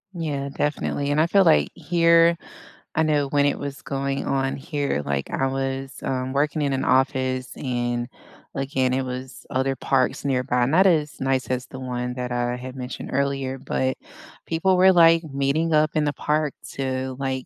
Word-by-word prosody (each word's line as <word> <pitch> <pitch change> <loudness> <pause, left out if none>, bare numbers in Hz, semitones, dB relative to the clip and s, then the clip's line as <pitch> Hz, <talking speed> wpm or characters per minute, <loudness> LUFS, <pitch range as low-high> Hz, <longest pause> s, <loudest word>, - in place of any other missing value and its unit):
Yeah, 145 -5 -3
definitely, 145 0 -2
and 150 +2 +3
I 160 - +3
feel, 195 +2 +4
like, 75 - +4
here, 170 0 +4 0.6
I 160 - +3
know 150 -2 +1
when 140 +1 +2
it 145 - 0
was 140 -1 -6
going 135 0 -2
on 135 -1 0
here, 140 - -2
like, 70 -1 -2
I 135 - 0
was, 135 0 -3
um, 130 0 -2
working 150 +2 0
in 140 -1 0
an 130 - -1
office 130 -1 +1
and 120 -2 -2 0.5
again 135 -2 0
it 130 +1 0
was 130 +1 -7
other 135 +1 0
parks 130 0 0
nearby, 125 -2 +1
not 175 +9 +4
as 155 -4 +1
nice 130 -1 0
as 125 -1 -2
the 130 - -9
one 125 -1 -3
that 125 -1 -4
I 120 0 -1
had 130 +1 -8
mentioned 125 -1 -6
earlier, 135 -1 -1
but 130 -1 -1 0.5
people 180 +3 +2
were, 190 +1 +7
like, 165 -1 +6
meeting 140 +3 0
up 155 0 +3
in 155 -1 +1
the 145 - 0
park 150 -1 0 0.2
to, 130 -1 -3
like, 130 -1 -2
135 Hz, 180 wpm, -23 LUFS, 130-150 Hz, 0.6 s, were